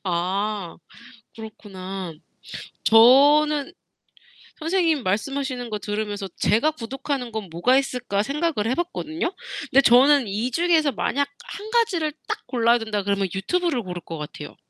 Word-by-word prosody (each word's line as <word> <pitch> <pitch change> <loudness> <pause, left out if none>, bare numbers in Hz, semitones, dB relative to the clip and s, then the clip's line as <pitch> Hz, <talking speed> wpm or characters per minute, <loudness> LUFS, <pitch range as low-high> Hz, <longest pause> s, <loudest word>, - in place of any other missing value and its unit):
아 190 +1 -2 0.6
그렇구나. 195 -5 -8 0.7
저는 285 +6 +5 0.9
선생님 325 -3 +1
말씀하시는 250 +5 -2
거 210 - -2
들으면서 205 -1 -4
'제가 230 +10 +2
구독하는 270 0 -4
건 215 -3 -5
뭐가 175 +11 +2
있을까?' 250 -7 -1
생각을 280 -3 -1
해 - - +1
봤거든요. 340 0 -3 0.4
근데 275 - +6
저는 270 +2 +5
이 215 +6 -2
중에서 320 -1 +2
만약 280 +6 -1 0.2
1 420 +2 -8
가지를 390 -10 +1 0.2
딱 - - -2
골라야 240 -1 +3
된다 220 -3 -3
그러면 200 -1 0
유튜브를 310 - -1
고를 180 -3 -6
것 165 - -7
같아요. 150 0 -8
245 Hz, 295 characters per minute, -23 LUFS, 205-295 Hz, 0.9 s, 근데